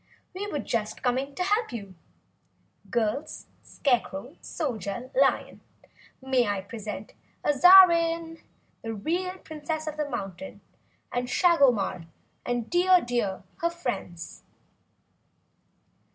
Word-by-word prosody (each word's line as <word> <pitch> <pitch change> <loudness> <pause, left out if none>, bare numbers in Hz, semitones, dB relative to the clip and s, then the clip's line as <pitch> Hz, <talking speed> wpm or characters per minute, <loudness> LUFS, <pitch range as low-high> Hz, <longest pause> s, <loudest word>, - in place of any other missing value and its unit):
"We 395 +3 -4
were - - -2
just 225 -6 -3
coming 265 +3 -1
to 360 - -1
help 415 - +1
you. 200 -5 -7 1.0
Girls, 235 +4 -2 0.2
Scarecrow, 245 - -1
Soldier, 240 - -4
Lion 270 +1 +1 0.6
may 260 -3 +1
I 200 -1 -1
present 210 +1 -7 0.3
Azarine, 335 +1 +6 0.4
the 225 0 -5
real 360 - -2
Princess 315 -1 -5
of 305 -1 -5
this 300 -1 -2
Mountain, 200 0 -6 0.5
and 245 0 -2
Shagomar 250 - +3 0.4
and 240 -2 -2
Dear 360 +1 +5
Deer, 235 -6 -2
her 340 - 0
friends!" 245 - -5
265 Hz, 105 wpm, -27 LUFS, 225-335 Hz, 1.0 s, Azarine